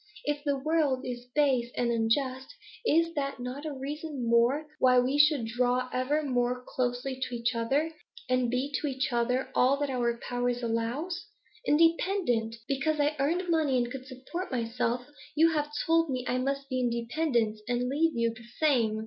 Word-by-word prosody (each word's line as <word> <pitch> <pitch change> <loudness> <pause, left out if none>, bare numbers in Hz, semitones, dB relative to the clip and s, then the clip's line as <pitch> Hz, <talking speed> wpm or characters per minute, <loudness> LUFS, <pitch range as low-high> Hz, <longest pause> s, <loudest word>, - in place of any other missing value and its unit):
If 295 0 -1
the 285 -2 +1
world 285 -2 +1
is 245 -1 -6
base 265 -5 +3
and 240 -1 +1
unjust, 255 - 0 0.3
is 335 -5 +2
not 275 -1 -2
that 250 +4 -6
a - - -3
reason 285 0 -5
the - - -2
more 240 +6 +3
why 255 -1 +5
we 260 +4 +2
should 295 -5 +5
draw 250 +2 0
ever 285 +5 +1
more 250 -2 0
closely 255 +1 -2
to 250 - -2
each 235 -1 0
other, 270 +8 0 0.4
and 255 -1 +2
be 260 +4 -1
to 300 - -1
each 265 -2 -1
other 250 +2 0
all 260 +3 +4
that 285 -1 -1
our 235 -2 0
power 245 0 0
allows? 245 +8 -2 0.4
Independent! 330 - +2
Because 300 +3 0
I 295 +1 +2
earned 340 +7 +1
money 315 -6 +2
and 240 0 0
could 265 0 -7
support 265 +8 -6
myself, 245 0 -1 0.3
you 325 +2 +5
have 295 -1 -1
told 330 -1 +3
me 255 -2 -2
I 250 - 0
must 275 +1 -2
be 255 -2 -1
independent, 235 -1 0
and 245 0 0
leave 310 +5 +1
you 230 0 +2
the 230 0 -14
same. 235 -8 +2
260 Hz, 175 wpm, -29 LUFS, 245-295 Hz, 0.4 s, why